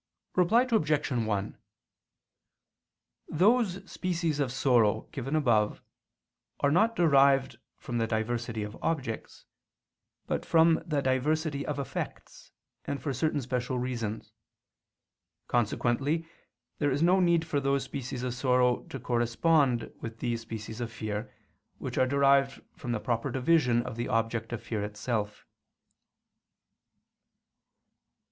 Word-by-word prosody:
_ -, -, -40 dB
Reply 200 Hz, +7 st, +4 dB
Obj. 155 Hz, -8 st, +1 dB
1: 110 Hz, -5 st, -1 dB, 1.7 s
Those 195 Hz, +1 st, +2 dB
species 170 Hz, -4 st, -1 dB
of 135 Hz, -3 st, 0 dB
sorrow 120 Hz, -5 st, +3 dB
given 135 Hz, +3 st, -3 dB
above 115 Hz, -8 st, +2 dB, 0.8 s
are 140 Hz, -, +2 dB
not 220 Hz, +8 st, +3 dB
derived 135 Hz, -5 st, +4 dB, 0.2 s
from 120 Hz, -1 st, -4 dB
the 115 Hz, -, +1 dB
diversity 115 Hz, 0 st, -2 dB
of 105 Hz, +2 st, -7 dB
objects, 135 Hz, -9 st, -3 dB, 0.8 s
but -, -, -2 dB
from 165 Hz, 0 st, +4 dB
the 145 Hz, -3 st, 0 dB
diversity 140 Hz, +3 st, 0 dB
of 150 Hz, -, -3 dB
effects, 140 Hz, -, -6 dB, 0.3 s
and 140 Hz, -, -3 dB
for 140 Hz, -, -3 dB
certain 145 Hz, +3 st, 0 dB
special 125 Hz, 0 st, -2 dB
reasons. 115 Hz, -4 st, -4 dB, 1.2 s
Consequently 125 Hz, +7 st, 0 dB, 0.5 s
there 145 Hz, -, +2 dB
is 145 Hz, +3 st, 0 dB
no 180 Hz, +3 st, +5 dB
need 170 Hz, -2 st, +3 dB
for 155 Hz, -3 st, 0 dB
those 140 Hz, 0 st, +1 dB
species 130 Hz, -2 st, -5 dB
of 125 Hz, -1 st, -2 dB
sorrow 125 Hz, -1 st, +2 dB
to 135 Hz, -, -7 dB
correspond 120 Hz, +2 st, +1 dB
with 115 Hz, -1 st, -6 dB
these 120 Hz, -1 st, -2 dB
species 110 Hz, 0 st, -7 dB
of 115 Hz, -1 st, -4 dB
fear, 110 Hz, 0 st, -4 dB, 0.5 s
which -, -, -4 dB
are 130 Hz, -, +4 dB
derived 140 Hz, 0 st, +3 dB, 0.2 s
from 130 Hz, -6 st, -5 dB
the 120 Hz, -, -1 dB
proper 120 Hz, +3 st, -1 dB
division 125 Hz, -2 st, +2 dB
of 115 Hz, -, -7 dB
the 120 Hz, -, -2 dB
object 115 Hz, 0 st, -1 dB
of 120 Hz, -, -5 dB
fear 105 Hz, -3 st, -3 dB
itself. 105 Hz, 0 st, -3 dB
130 Hz, 125 wpm, -29 LUFS, 115-150 Hz, 1.7 s, no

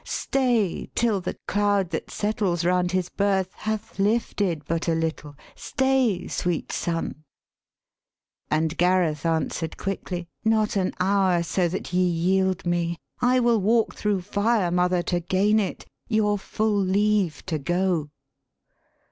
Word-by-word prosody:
Stay, 240 Hz, -9 st, 0 dB
till 225 Hz, -5 st, +1 dB
the 180 Hz, -, -4 dB
cloud 205 Hz, -2 st, +1 dB
that 160 Hz, -, -4 dB
settles 200 Hz, -5 st, -1 dB
round 180 Hz, 0 st, +2 dB
his 185 Hz, -1 st, 0 dB
birth 190 Hz, -1 st, 0 dB
Hath 215 Hz, -1 st, -5 dB
lifted 200 Hz, -, 0 dB
but 165 Hz, +2 st, -2 dB
a 165 Hz, -, +2 dB
little. 160 Hz, -2 st, -3 dB, 0.2 s
Stay, 265 Hz, -8 st, +1 dB
sweet 175 Hz, -3 st, -2 dB
son.' 165 Hz, -2 st, -3 dB, 1.3 s
And 160 Hz, +1 st, 0 dB
Gareth 175 Hz, -4 st, +2 dB
answer'd 160 Hz, 0 st, -1 dB
quickly, 180 Hz, -3 st, -4 dB
' -, -, -49 dB
Not 220 Hz, -1 st, +2 dB
an 185 Hz, -2 st, 0 dB
hour, 185 Hz, -2 st, +2 dB
So 175 Hz, +2 st, +1 dB
that 180 Hz, +1 st, -5 dB
ye 180 Hz, -, +3 dB
yield 185 Hz, +2 st, +1 dB
me 170 Hz, -1 st, 0 dB, 0.2 s
I 250 Hz, +1 st, +4 dB
will 235 Hz, -3 st, +3 dB
walk 225 Hz, +3 st, +2 dB
thro' 205 Hz, -3 st, -1 dB
fire, 205 Hz, 0 st, +1 dB
Mother, 180 Hz, 0 st, +2 dB
to 175 Hz, 0 st, 0 dB
gain 195 Hz, +5 st, +2 dB
it 200 Hz, -, -3 dB, 0.2 s
your 210 Hz, -3 st, +1 dB
full 215 Hz, +1 st, 0 dB
leave 200 Hz, -2 st, +1 dB
to 160 Hz, -4 st, -2 dB
go.' 175 Hz, 0 st, 0 dB
185 Hz, 140 wpm, -25 LUFS, 175-210 Hz, 1.3 s, I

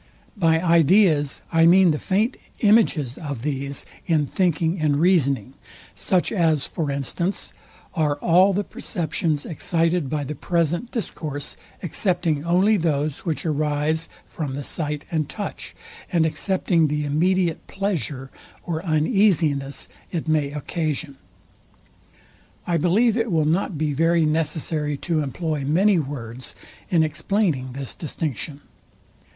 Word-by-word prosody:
By 165 Hz, -5 st, +3 dB
ideas 165 Hz, -3 st, +3 dB
I 165 Hz, 0 st, +6 dB
mean 180 Hz, 0 st, +6 dB
the 150 Hz, -, -1 dB
faint 215 Hz, +7 st, +1 dB, 0.3 s
images 195 Hz, -, +3 dB
of 140 Hz, -8 st, -5 dB
these 140 Hz, -1 st, -3 dB, 0.2 s
in 155 Hz, -4 st, +2 dB
thinking 170 Hz, +1 st, 0 dB
and 150 Hz, -2 st, +2 dB
reasoning; 145 Hz, -6 st, +2 dB, 0.4 s
such 185 Hz, -2 st, +1 dB
as, 160 Hz, -8 st, +2 dB
for 160 Hz, -5 st, -3 dB
instance, 140 Hz, +7 st, -2 dB, 0.4 s
are 150 Hz, -3 st, +1 dB
all 180 Hz, +6 st, +4 dB
the 200 Hz, +2 st, 0 dB
perceptions 160 Hz, -4 st, -1 dB
excited 165 Hz, -1 st, 0 dB
by 150 Hz, 0 st, -1 dB
the 140 Hz, -, -4 dB
present 170 Hz, -, -1 dB
discourse, 155 Hz, -, -4 dB, 0.3 s
excepting 165 Hz, -3 st, 0 dB
only 185 Hz, +6 st, +3 dB
those 150 Hz, -3 st, -1 dB
which 165 Hz, -2 st, -2 dB
arise 155 Hz, +1 st, 0 dB, 0.2 s
from 145 Hz, -5 st, -5 dB
the 140 Hz, -, -4 dB
sight 150 Hz, 0 st, -2 dB
and 155 Hz, -3 st, -1 dB
touch, 205 Hz, -2 st, -6 dB, 0.4 s
and 170 Hz, -3 st, +3 dB
excepting 170 Hz, -1 st, +1 dB
the 150 Hz, 0 st, -1 dB
immediate 170 Hz, +3 st, +1 dB
pleasure 155 Hz, -9 st, -3 dB, 0.3 s
or 165 Hz, -1 st, -3 dB
uneasiness 155 Hz, -, +1 dB, 0.2 s
it 165 Hz, -3 st, -3 dB
may 155 Hz, -3 st, +1 dB
occasion. 150 Hz, -1 st, -3 dB, 1.5 s
I 170 Hz, -1 st, +1 dB
believe 205 Hz, +8 st, +3 dB
it 225 Hz, -2 st, 0 dB
will 160 Hz, -3 st, +2 dB
not 165 Hz, +2 st, 0 dB
be 150 Hz, -1 st, 0 dB
very 165 Hz, +2 st, +3 dB
necessary 155 Hz, -1 st, -1 dB
to 160 Hz, +1 st, -1 dB
employ 150 Hz, +1 st, -2 dB
many 180 Hz, +7 st, +3 dB
words 130 Hz, -4 st, -6 dB, 0.3 s
in 165 Hz, -2 st, +4 dB
explaining 155 Hz, -, 0 dB
this 135 Hz, -1 st, -5 dB
distinction. 150 Hz, -2 st, -5 dB
160 Hz, 125 wpm, -23 LUFS, 145-175 Hz, 1.5 s, I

